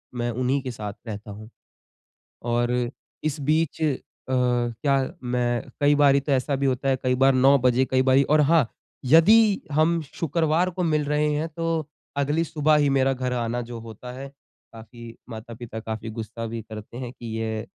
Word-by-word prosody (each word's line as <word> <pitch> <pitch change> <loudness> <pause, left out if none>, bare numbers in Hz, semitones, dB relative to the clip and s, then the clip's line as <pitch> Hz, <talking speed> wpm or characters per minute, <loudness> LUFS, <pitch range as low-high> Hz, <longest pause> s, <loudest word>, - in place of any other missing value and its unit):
मैं 120 0 -1
उन्हीं 130 +4 0
के 130 -1 -5
साथ 105 -3 -6
रहता 105 -1 -7
हूँ। 110 +2 -10 0.9
और 120 0 0 0.5
इस 155 0 -2
बीच 155 +2 0
अ, 155 -3 +2 0.4
क्या 125 +1 0
मैं 120 -1 0 0.2
कई 145 0 +4
बारी 140 -1 +5
तो 140 +1 -4
ऐसा 135 +1 +1
भी 140 +1 -1
होता 135 +1 0
है 135 - +3
कई 125 0 +2
बार 135 +1 +4
9 135 +2 +5
बजे 125 +1 +3
कई 130 0 +3
बारी 130 +1 +4
और 150 +2 +3
हाँ, 150 -3 +4 0.4
यदि 200 - +6
हम 160 +3 +2
शुक्रवार 165 +2 +1
को 180 0 -3
मिल 155 -3 +1
रहे 150 +1 +1
हैं 150 +2 -1
तो 165 -1 -2 0.3
अगली 145 +4 +1
सुबह 155 -1 +2
ही 145 -1 +3
मेरा 135 0 +2
घर 130 -1 -3
आना 120 0 -2
जो 120 0 -7
होता 115 +2 -9
है, 135 +2 -7 0.5
काफ़ी 115 +1 -11
माता-पिता 115 0 -8
काफ़ी 110 0 -5
गुस्सा 115 +1 -6
भी 115 0 -5
करते 110 +1 -10
हैं 125 -2 -5
कि 120 - -12
ये 110 -1 -3
130 Hz, 180 wpm, -24 LUFS, 120-150 Hz, 0.9 s, यदि